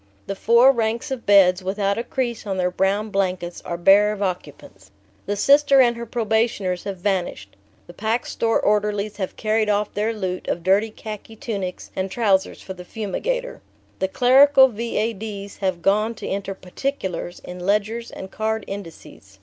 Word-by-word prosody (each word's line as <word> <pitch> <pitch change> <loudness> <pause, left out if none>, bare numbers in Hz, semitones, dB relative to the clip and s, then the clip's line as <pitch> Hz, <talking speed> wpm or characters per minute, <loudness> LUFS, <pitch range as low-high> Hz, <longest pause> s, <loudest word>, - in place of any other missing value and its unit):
The - - -3
four 235 +6 +5
ranks 230 0 -2
of 260 -3 -5
beds, 190 -2 +5
without 200 +2 -1
a - - -2
crease 240 -3 -3
on 195 -1 -2
their 180 -1 0
brown 200 +3 0
blankets, 185 -3 -2
are 170 - -5
bare 200 +4 +5
of 205 -1 -3
occupants. 145 - -6 0.4
The 205 - -1
Sister 280 +5 +5
and 240 -2 +5
her 235 0 -7
probationers 220 -5 -1
have 200 -2 -4
vanished. 175 - -2 0.3
The 175 - -13
Pack 220 +5 -1
Store 225 -1 0
orderlies 210 0 0
have 190 -3 -4
carried 215 0 0
off 210 0 0
their 210 +2 0
loot 185 -4 -4
of 170 - -2
dirty 195 +4 +3
khaki 215 0 -9
tunics 200 -5 -5
and 190 0 -2
trousers 195 -3 0
for 190 - -7
the 180 -1 -10
fumigator. 455 - -4 0.4
The 190 - +1
clerical 265 +5 +6
V.A.D.'s 215 -3 -4
have 185 -4 -2
gone 215 +3 +2
to - - -7
enter 195 0 -3
"particulars" 185 -3 -4
in 180 0 -8
ledgers 215 +4 0
and 190 - -9
card 220 0 -2
indices. 165 - -10
205 Hz, 165 wpm, -22 LUFS, 190-225 Hz, 0.4 s, clerical